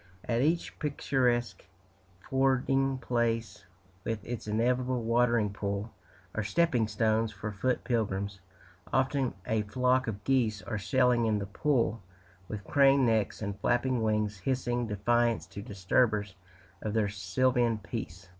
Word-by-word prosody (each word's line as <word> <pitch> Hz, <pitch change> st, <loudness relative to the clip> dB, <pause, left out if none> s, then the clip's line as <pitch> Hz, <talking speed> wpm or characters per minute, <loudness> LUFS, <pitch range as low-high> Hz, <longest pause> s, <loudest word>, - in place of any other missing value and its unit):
At 115 Hz, 0 st, +1 dB
each 165 Hz, +4 st, 0 dB
picturesque 125 Hz, -5 st, 0 dB, 0.6 s
fording 135 Hz, 0 st, +2 dB
place, 115 Hz, -5 st, -1 dB, 0.4 s
with 110 Hz, -3 st, -3 dB
its 120 Hz, -2 st, -5 dB
inevitable 125 Hz, +3 st, +1 dB
watering 115 Hz, -2 st, +2 dB
pool, 100 Hz, +2 st, -3 dB, 0.4 s
are 110 Hz, -, -1 dB
stepping 120 Hz, +1 st, +2 dB
stones 110 Hz, +1 st, +1 dB
for 105 Hz, +1 st, -5 dB
foot 125 Hz, +5 st, -1 dB
pilgrims; 100 Hz, -4 st, -1 dB, 0.5 s
often 130 Hz, -1 st, +1 dB
a 110 Hz, -1 st, +1 dB
flock 125 Hz, +4 st, +1 dB
of 105 Hz, -2 st, -4 dB
geese 110 Hz, -7 st, +1 dB
are 105 Hz, +3 st, -3 dB
sailing 125 Hz, +2 st, +2 dB
in 110 Hz, -1 st, +2 dB
the 100 Hz, -, -3 dB
pool, 115 Hz, 0 st, 0 dB, 0.5 s
with 105 Hz, -2 st, -6 dB
craned 135 Hz, +2 st, +4 dB
necks 110 Hz, -2 st, 0 dB
and 100 Hz, 0 st, -4 dB
flapping 120 Hz, +2 st, +1 dB
wings 105 Hz, -2 st, 0 dB
hissing 120 Hz, 0 st, -1 dB
defiance 115 Hz, +3 st, +1 dB
to 100 Hz, -, -9 dB
disturbers 105 Hz, 0 st, +1 dB, 0.5 s
of 110 Hz, 0 st, -3 dB
their 110 Hz, -2 st, +2 dB
sylvan 120 Hz, +3 st, +1 dB
peace. 100 Hz, -3 st, -7 dB
115 Hz, 130 wpm, -30 LUFS, 105-125 Hz, 0.6 s, craned